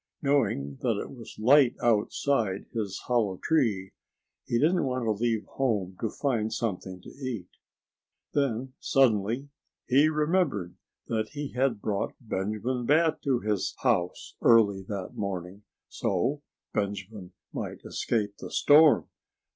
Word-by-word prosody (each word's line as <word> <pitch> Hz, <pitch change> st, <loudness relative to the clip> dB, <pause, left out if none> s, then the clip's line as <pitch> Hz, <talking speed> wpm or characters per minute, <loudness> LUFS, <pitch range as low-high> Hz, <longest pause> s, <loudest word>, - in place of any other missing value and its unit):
Knowing 70 Hz, -, +1 dB
that -, -, +1 dB
it -, -, -6 dB
was -, -, -11 dB
light 130 Hz, +3 st, +5 dB
outside 110 Hz, -2 st, +1 dB
his 105 Hz, -5 st, -3 dB
hollow 110 Hz, -6 st, +1 dB
tree, 110 Hz, -, +1 dB, 0.6 s
he 120 Hz, -, +1 dB
didn't 165 Hz, +6 st, +3 dB
want 130 Hz, -1 st, -1 dB
to 110 Hz, -, +1 dB
leave 110 Hz, +1 st, 0 dB
home 105 Hz, -9 st, -1 dB
to 115 Hz, -, 0 dB
find 115 Hz, -6 st, -1 dB
something 95 Hz, -4 st, -3 dB
to -, -, -12 dB
eat. 125 Hz, -10 st, -6 dB, 0.8 s
Then, 130 Hz, -2 st, 0 dB
suddenly, 120 Hz, +1 st, +2 dB, 0.4 s
he 140 Hz, +4 st, +4 dB
remembered 150 Hz, -, 0 dB, 0.3 s
that 110 Hz, -2 st, -1 dB
he 145 Hz, -1 st, -4 dB
had 125 Hz, -4 st, 0 dB
brought 100 Hz, -2 st, -1 dB
Benjamin 115 Hz, +3 st, -2 dB
Bat 160 Hz, +2 st, +3 dB
to 130 Hz, -3 st, +2 dB
his 105 Hz, -3 st, -1 dB
house 100 Hz, -9 st, 0 dB
early 105 Hz, -4 st, +5 dB
that 100 Hz, -3 st, -5 dB
morning, 95 Hz, 0 st, -5 dB, 0.2 s
so 125 Hz, +10 st, -1 dB, 0.3 s
Benjamin 100 Hz, -2 st, -4 dB, 0.2 s
might -, -, -5 dB
escape 105 Hz, -3 st, -1 dB
the -, -, -7 dB
storm.... 150 Hz, -4 st, +5 dB
115 Hz, 130 wpm, -28 LUFS, 100-135 Hz, 0.8 s, light